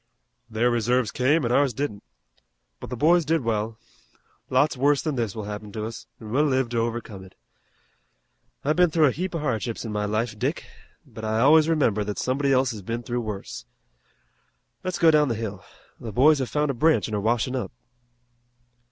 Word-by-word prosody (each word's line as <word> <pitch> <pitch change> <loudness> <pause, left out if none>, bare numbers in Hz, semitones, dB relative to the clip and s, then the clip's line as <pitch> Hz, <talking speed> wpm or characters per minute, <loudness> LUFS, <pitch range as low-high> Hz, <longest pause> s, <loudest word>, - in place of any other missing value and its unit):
"Their 115 +2 +1
reserves 120 0 +1
came 140 +3 +2
an' 120 - -1
ours 135 -2 +2
didn't. 120 -7 -3 0.8
But - - -8
the 125 - -5
boys 170 +6 +4
did 160 +1 +1
well. 110 -1 -2 0.7
Lots 150 0 +2
worse 140 +2 +2
than 155 +1 -2
this 115 -6 -2
will 110 - -5
happen 105 0 -7
to 110 -1 -4
us, 115 0 -8
an' 110 -2 -9
we'll 145 +5 +3
live 130 -3 +1
to 120 -1 -1
overcome 115 -4 -4
it. 95 - -16 1.3
I've 150 +2 +2
been 180 -1 +4
through 160 0 +3
a 140 - +4
heap 180 +6 -4
of 165 - -2
hardships 120 -4 -2
in 110 - -4
my 105 0 -1
life, 110 +1 -2
Dick, - - -2 0.4
but 110 - -11
I 110 0 0
always 155 +4 +5
remember 120 -10 +2
that 105 0 -5
somebody 135 +2 0
else 130 -1 +3
has 110 -3 -7
been 115 +5 -4
through 120 -1 -2
worse. 105 -3 -6 1.2
Let's 185 -1 -2
go 165 -1 +5
down 150 -1 +4
the 120 - -1
hill. 105 -3 -5 0.4
The 115 - -7
boys 145 +7 +4
have 130 - -2
found 150 -1 0
a - - -4
branch 155 +5 +2
an' 110 - -7
are 105 - -1
washin' 115 +3 0
up." 115 -7 -3
120 Hz, 195 wpm, -25 LUFS, 110-145 Hz, 1.3 s, always